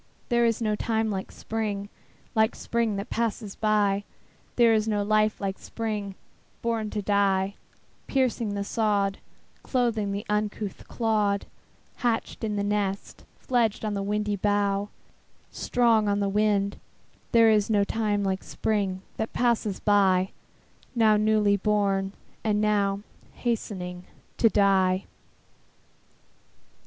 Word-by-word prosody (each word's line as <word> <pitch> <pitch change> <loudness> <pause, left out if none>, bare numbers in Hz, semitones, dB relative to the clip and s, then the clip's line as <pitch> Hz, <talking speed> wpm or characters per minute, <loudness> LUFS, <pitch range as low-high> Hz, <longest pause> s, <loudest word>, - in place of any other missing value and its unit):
There 235 -1 +3
is 230 0 0
no 215 -1 +1
time 220 0 0
like 190 -1 -4
Spring, 210 -3 -3 0.5
Like 220 -1 +2
Spring 230 -3 -1
that 200 +1 -5
passes 220 -3 -2
by; 205 -2 +2 0.5
There 235 -2 +5
is 215 0 +1
no 210 -2 +1
life 215 +1 +2
like 195 -1 -3
Spring 215 -3 -3
life 195 - -9 0.5
born 225 -2 -1
to 210 -1 -3
die, 195 -1 +2 0.5
Piercing 240 -5 0
the 200 - -1
sod, 200 -2 0 0.4
Clothing 230 -5 0
the 200 +1 -4
uncouth 210 -1 -2
clod, 210 -3 0 0.5
Hatched 235 -3 -1
in 215 -2 -1
the 200 - 0
nest, 205 -1 -2
Fledged 230 -4 0
on 210 - -1
the 200 - -2
windy 210 +1 -1
bough, 205 0 +1 0.6
Strong 230 -3 +2
on 200 0 +1
the 200 - +1
wing: 200 -1 +2 0.6
There 230 -1 +6
is 210 -1 +2
no 205 -2 +3
time 210 -1 0
like 190 -1 -1
Spring 195 -3 -1
that 220 - -3
passes 230 -5 +1
by, 195 -2 +3 0.6
Now 220 -2 +5
newly 210 -1 +3
born, 195 -1 +1 0.3
and 210 -1 +1
now 205 -2 +1 0.3
Hastening 185 -6 -3 0.3
to 225 - +5
die. 190 -2 +3
210 Hz, 130 wpm, -26 LUFS, 200-220 Hz, 0.6 s, There